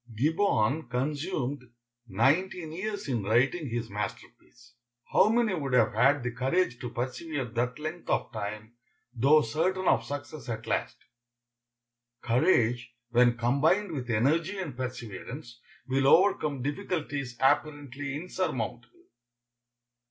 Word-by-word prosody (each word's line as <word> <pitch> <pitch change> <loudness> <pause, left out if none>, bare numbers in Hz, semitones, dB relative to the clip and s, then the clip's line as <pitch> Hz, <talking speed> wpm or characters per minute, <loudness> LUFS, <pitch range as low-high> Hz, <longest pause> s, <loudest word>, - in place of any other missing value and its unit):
Gibbon 150 - +1
consumed 140 +1 -2 0.4
nineteen 155 - +1
years 200 +3 -4
in 120 -5 0
writing 125 - +1
his 115 0 -3
masterpiece. 115 +3 -8 0.4
How 205 - +6
many 230 -2 +2
would 140 -7 -3
have 125 - +4
had 135 +5 +3
the 125 - -2
courage 130 +2 0
to 125 - -5
persevere 130 +4 -3
that 120 +2 -2
length 155 +3 -6
of - - 0
time, 105 +1 -6 0.4
though 140 +6 +5
certain 180 +10 -1
of - - +4
success 145 -1 -7
at 110 -1 -4
last? - - -2 1.2
Courage, 120 -2 +2 0.2
when 120 0 +4
combined 145 - +2
with 130 -5 -5
energy 155 - +1
and 170 -9 -5
perseverance, 125 0 -7 0.3
will 135 +1 +2
overcome 150 -6 +4
difficulties 145 -5 -3
apparently 140 0 0
insurmountable. 125 - -4
135 Hz, 115 wpm, -28 LUFS, 120-160 Hz, 1.2 s, How